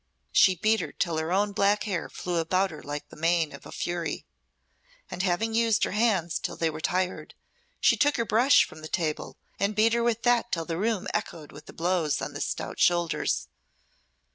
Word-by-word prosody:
She 190 Hz, -, +5 dB
beat 215 Hz, +5 st, +2 dB
her -, -, -4 dB
till 170 Hz, -3 st, -1 dB
her 160 Hz, +2 st, -3 dB
own 205 Hz, +2 st, +2 dB
black 200 Hz, +1 st, +2 dB
hair 195 Hz, -6 st, -3 dB
flew 175 Hz, -1 st, -3 dB
about 185 Hz, +3 st, +1 dB
her 155 Hz, -, -9 dB
like 145 Hz, +1 st, -6 dB
the -, -, -13 dB
mane 165 Hz, 0 st, +1 dB
of -, -, -11 dB
a -, -, -11 dB
fury; 175 Hz, -1 st, -3 dB, 0.9 s
and 180 Hz, -, -3 dB
having 200 Hz, +4 st, 0 dB
used 225 Hz, -1 st, +2 dB
her -, -, 0 dB
hands 200 Hz, -6 st, +1 dB
till -, -, -4 dB
they 165 Hz, -1 st, 0 dB
were 155 Hz, +1 st, -7 dB
tired, 185 Hz, +2 st, -2 dB, 0.4 s
she -, -, +4 dB
took 290 Hz, 0 st, +2 dB
her 235 Hz, -, 0 dB
brush 240 Hz, +6 st, +5 dB
from 155 Hz, -, -13 dB
the 155 Hz, -, -7 dB
table 155 Hz, -3 st, -3 dB, 0.2 s
and 200 Hz, +1 st, 0 dB
beat 220 Hz, +2 st, +4 dB
her 235 Hz, -, +2 dB
with 235 Hz, -1 st, 0 dB
that 240 Hz, -1 st, +2 dB
till 165 Hz, -1 st, -1 dB
the 165 Hz, 0 st, -3 dB
room 215 Hz, -2 st, 0 dB
echoed 155 Hz, -3 st, -4 dB
with 150 Hz, +1 st, -13 dB
the -, -, -9 dB
blows 165 Hz, -4 st, 0 dB
on -, -, -5 dB
the -, -, -6 dB
stout -, -, -4 dB
shoulders. 175 Hz, -1 st, +1 dB
185 Hz, 205 wpm, -27 LUFS, 165-215 Hz, 0.9 s, She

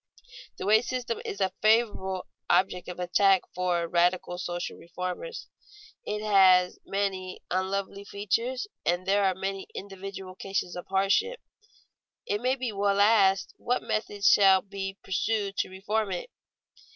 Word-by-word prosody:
The -, -, -5 dB
wage 220 Hz, +3 st, +4 dB
system 250 Hz, -2 st, -3 dB
is 200 Hz, -, -5 dB
a 190 Hz, -1 st, +1 dB
favorite 210 Hz, -4 st, +2 dB, 0.3 s
object 180 Hz, 0 st, +2 dB
of 180 Hz, -, -7 dB
attack 185 Hz, +2 st, +3 dB
for 175 Hz, -2 st, 0 dB
radical 175 Hz, +1 st, +1 dB
social 175 Hz, -1 st, -4 dB
reformers. 180 Hz, -, -6 dB, 0.6 s
It 210 Hz, 0 st, -3 dB
has 185 Hz, -3 st, +5 dB
many 190 Hz, -2 st, -3 dB
unlovely 195 Hz, +2 st, -2 dB
features 230 Hz, -, -1 dB, 0.2 s
and 175 Hz, +2 st, 0 dB
there 200 Hz, +1 st, +3 dB
are 190 Hz, -1 st, +2 dB
many 195 Hz, +1 st, -4 dB
individual 195 Hz, -1 st, -7 dB
cases 195 Hz, -1 st, -3 dB
of 180 Hz, -, -7 dB
hardship. 195 Hz, -, +1 dB, 0.9 s
It 205 Hz, +1 st, -1 dB
may 255 Hz, +2 st, +1 dB
well 200 Hz, 0 st, +1 dB
be -, -, 0 dB
asked, 200 Hz, -3 st, +4 dB
What 245 Hz, +1 st, -1 dB
method 205 Hz, -2 st, -2 dB
shall 190 Hz, -2 st, +6 dB
be 195 Hz, -1 st, -6 dB
pursued 200 Hz, +1 st, -1 dB
to -, -, 0 dB
reform 200 Hz, +2 st, -2 dB
it? -, -, -5 dB
195 Hz, 140 wpm, -28 LUFS, 185-205 Hz, 0.9 s, shall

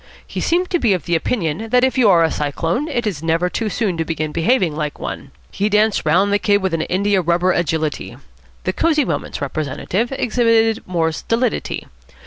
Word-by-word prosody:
He -, -, -5 dB
seemed 360 Hz, +2 st, 0 dB
to 350 Hz, -, +2 dB
be 225 Hz, -8 st, +3 dB
of 175 Hz, -, -6 dB
the 170 Hz, -, +1 dB
opinion 175 Hz, +2 st, -2 dB
that 250 Hz, +2 st, +3 dB
if 260 Hz, -, +2 dB
you 245 Hz, -5 st, +4 dB
are 170 Hz, -3 st, +5 dB
a 160 Hz, -, +1 dB
cyclone, 165 Hz, -, -1 dB
it 240 Hz, -6 st, -2 dB
is 185 Hz, -8 st, -2 dB
never 165 Hz, +2 st, 0 dB
too 225 Hz, -2 st, -2 dB
soon 200 Hz, -5 st, -1 dB
to 165 Hz, -, 0 dB
begin 155 Hz, -1 st, -3 dB
behaving 170 Hz, -, +1 dB
like 150 Hz, -1 st, -3 dB
one. 140 Hz, -, -6 dB, 0.2 s
He 205 Hz, +2 st, -1 dB
danced 210 Hz, 0 st, +2 dB
round 200 Hz, +3 st, +3 dB
the 205 Hz, -, +3 dB
Kid 205 Hz, -1 st, +3 dB
with 190 Hz, -3 st, -2 dB
an 165 Hz, -, 0 dB
india 195 Hz, +3 st, +1 dB
rubber 175 Hz, +2 st, +2 dB
agility. 160 Hz, -3 st, -2 dB, 0.5 s
The 185 Hz, -, -1 dB
Cosy 305 Hz, -, +2 dB
Moments 150 Hz, -7 st, -3 dB
representative 155 Hz, -, -2 dB
exhibited 230 Hz, -3 st, +2 dB
more 165 Hz, -3 st, 0 dB
stolidity. 230 Hz, +8 st, -2 dB
185 Hz, 195 wpm, -19 LUFS, 165-230 Hz, 0.5 s, are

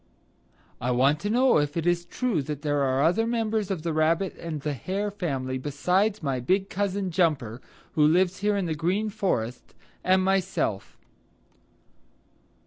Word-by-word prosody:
"I 125 Hz, -, -1 dB
want 135 Hz, +4 st, +3 dB
to 205 Hz, -, -3 dB
know 250 Hz, -3 st, +4 dB
if 145 Hz, +2 st, -1 dB
it 165 Hz, -, -1 dB
is 175 Hz, 0 st, +1 dB
true 210 Hz, -, -1 dB
that 145 Hz, +1 st, -6 dB
there 145 Hz, -1 st, +1 dB
are 135 Hz, 0 st, +1 dB
any 155 Hz, -, +5 dB
other 225 Hz, +6 st, 0 dB
members 220 Hz, -3 st, -1 dB
of 185 Hz, -6 st, -3 dB
the 165 Hz, -2 st, -1 dB
Rabbit 165 Hz, +4 st, +1 dB
and 165 Hz, -3 st, -4 dB
the 150 Hz, +1 st, -2 dB
Hare 195 Hz, -, -3 dB
family 135 Hz, -9 st, -3 dB
besides 180 Hz, +9 st, 0 dB
my 135 Hz, -3 st, -1 dB
big 190 Hz, +10 st, 0 dB
cousin, 200 Hz, -1 st, -1 dB
Jumper, 145 Hz, -, 0 dB, 0.3 s
who 150 Hz, -, +3 dB
lives 180 Hz, +3 st, +3 dB
here 205 Hz, +1 st, +1 dB
in 195 Hz, -, -1 dB
the 165 Hz, -, -1 dB
Green 185 Hz, +8 st, -1 dB
Forest, 125 Hz, -, -2 dB, 0.3 s
and 185 Hz, 0 st, +3 dB
myself." 190 Hz, -, -1 dB
175 Hz, 165 wpm, -26 LUFS, 145-195 Hz, 0.3 s, any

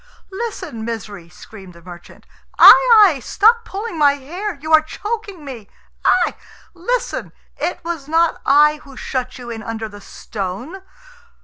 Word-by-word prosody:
"Listen, 380 Hz, -, -6 dB
Misery!" 205 Hz, -6 st, -7 dB
screamed 190 Hz, +1 st, -14 dB
the 170 Hz, -, -16 dB
merchant. 175 Hz, -1 st, -14 dB, 0.3 s
"Ai, -, -, +11 dB, 0.3 s
ai! 320 Hz, -8 st, +1 dB
stop 455 Hz, -, +2 dB
pulling 395 Hz, -3 st, -6 dB
my 285 Hz, -1 st, +5 dB
hair. 345 Hz, +10 st, -6 dB
You 310 Hz, +3 st, -4 dB
are 315 Hz, -, +8 dB
choking 405 Hz, 0 st, -6 dB
me. 235 Hz, -7 st, -9 dB, 0.3 s
Ai! -, -, +2 dB, 0.4 s
Listen. 485 Hz, +8 st, -3 dB, 0.3 s
It 355 Hz, -, -3 dB
was 330 Hz, -5 st, -5 dB
not 330 Hz, +1 st, +1 dB
I 300 Hz, +2 st, +4 dB
who 275 Hz, -3 st, -16 dB
shut 255 Hz, -1 st, -4 dB
you 245 Hz, -2 st, -8 dB
in 225 Hz, -1 st, -6 dB
under 225 Hz, 0 st, -5 dB
the 205 Hz, -1 st, -13 dB
stone...." 210 Hz, -, -7 dB
285 Hz, 145 wpm, -19 LUFS, 225-360 Hz, 0.4 s, Ai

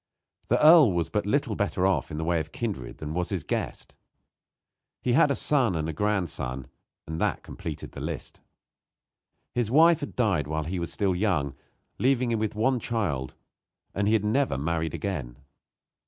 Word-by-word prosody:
The -, -, +2 dB
earl 155 Hz, -, +8 dB
was 85 Hz, -2 st, 0 dB
but 105 Hz, -1 st, -1 dB
little 120 Hz, -2 st, +1 dB
better 100 Hz, -2 st, 0 dB
off 90 Hz, -9 st, +1 dB
in 75 Hz, -, -5 dB
the 80 Hz, -, -2 dB
way 85 Hz, 0 st, +1 dB
of 80 Hz, 0 st, -5 dB
kindred 100 Hz, -, -4 dB
than 75 Hz, 0 st, -5 dB
was 90 Hz, +1 st, -1 dB
his 95 Hz, -6 st, -2 dB
guest. -, -, -4 dB, 1.0 s
He 125 Hz, -, 0 dB
had 140 Hz, -, +5 dB
a 140 Hz, -, +1 dB
son 130 Hz, -, +2 dB
and 80 Hz, -1 st, -1 dB
a 80 Hz, -, -3 dB
grandson, 85 Hz, -10 st, -1 dB, 0.4 s
and 80 Hz, +1 st, -5 dB
that -, -, 0 dB
completed 80 Hz, -3 st, -7 dB
the -, -, -8 dB
list. -, -, -6 dB, 1.1 s
His 120 Hz, -3 st, 0 dB
wife 165 Hz, +5 st, +6 dB
had 145 Hz, -, -6 dB
died 100 Hz, -, +1 dB
while 80 Hz, +1 st, -2 dB
he 90 Hz, +4 st, -3 dB
was 85 Hz, -, -3 dB
still 100 Hz, -3 st, +1 dB
young, 90 Hz, -9 st, 0 dB, 0.5 s
leaving 125 Hz, -1 st, +2 dB
him 115 Hz, -, 0 dB
with 110 Hz, -1 st, -2 dB
one 125 Hz, +4 st, +2 dB
child, 95 Hz, -, -2 dB, 0.6 s
and 100 Hz, +1 st, 0 dB
he 110 Hz, -, +3 dB
had 105 Hz, -1 st, 0 dB
never 130 Hz, -, +1 dB
married 80 Hz, +3 st, -1 dB
again. 70 Hz, -12 st, -4 dB
95 Hz, 180 wpm, -27 LUFS, 80-115 Hz, 1.1 s, earl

